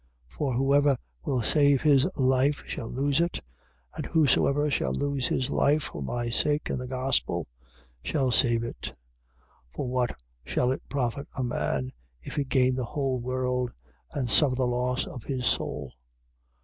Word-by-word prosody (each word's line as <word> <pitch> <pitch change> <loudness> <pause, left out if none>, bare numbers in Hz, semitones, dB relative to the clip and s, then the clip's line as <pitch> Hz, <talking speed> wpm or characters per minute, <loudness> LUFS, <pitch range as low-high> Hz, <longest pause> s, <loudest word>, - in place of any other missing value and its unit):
8:35. - - -20
For 140 -3 -1
whosoever 140 +1 +3 0.3
will 130 -3 0
save 140 +2 +4
his 140 -3 +5
life 130 +2 +2
shall 115 - -5
lose 140 +4 +1
it: 170 0 0 0.5
and - - -4
whosoever 145 -2 +3
shall - - 0
lose 140 -2 0
his 130 - -1
life 150 +1 +3
for 75 - -6
my 120 - -2
sake 145 +5 +1
and - - -2
the 125 - -5
gospel 130 +1 0 0.6
shall 135 -4 +1
save 115 -1 +3
it. 120 - -6
8:36. - - -5 0.8
For - - -3
what 125 - -1 0.2
shall 125 - +1
it 135 - -2
profit 140 0 -2
a 130 - -1
man, 70 - -1 0.3
if - - -7
he 145 - +1
gain 130 -1 +2
the 130 0 -2
whole 135 -1 -1
world 125 0 -1 0.4
and 130 -3 -2
suffer 130 +3 +4
the 130 0 +1
loss 125 +1 0
of 125 - -8
his 130 -3 -2
soul? 70 - -1
130 Hz, 165 wpm, -27 LUFS, 125-140 Hz, 0.8 s, his